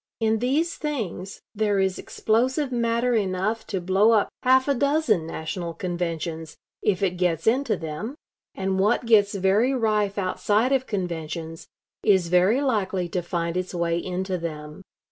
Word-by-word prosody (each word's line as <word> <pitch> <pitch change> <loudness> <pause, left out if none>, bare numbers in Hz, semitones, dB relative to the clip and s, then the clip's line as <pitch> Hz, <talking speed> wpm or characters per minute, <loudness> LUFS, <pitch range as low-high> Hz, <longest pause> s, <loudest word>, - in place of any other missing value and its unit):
In 220 -1 +1
these 290 +8 0
things 215 - -4
there 210 -1 +1
is 190 -1 0
explosive 260 +5 0
matter 235 0 +1
enough 210 +1 -1
to 195 - -2
blow 190 +5 +3
up 215 - +3
half 260 +1 +4
a 280 - +3
dozen 280 - +1
national 165 +1 -5
conventions, 165 -3 -4 0.2
if 200 -2 +1
it 180 -2 0
gets 175 -3 0
into 245 +1 +2
them; 165 - -5 0.4
and 190 0 -1
what 210 +5 +2
gets 205 -3 +4
very 200 +7 +2
rife 210 -4 +1
outside 205 +5 +1
of 265 -1 +1
conventions 165 -4 -4 0.4
is 190 -5 +3
very 185 +9 +4
likely 195 -8 0
to 180 - -1
find 170 0 -3
its 185 0 -3
way 170 -1 0
into 185 0 -3
them. 150 0 -6
195 Hz, 150 wpm, -24 LUFS, 175-230 Hz, 0.4 s, half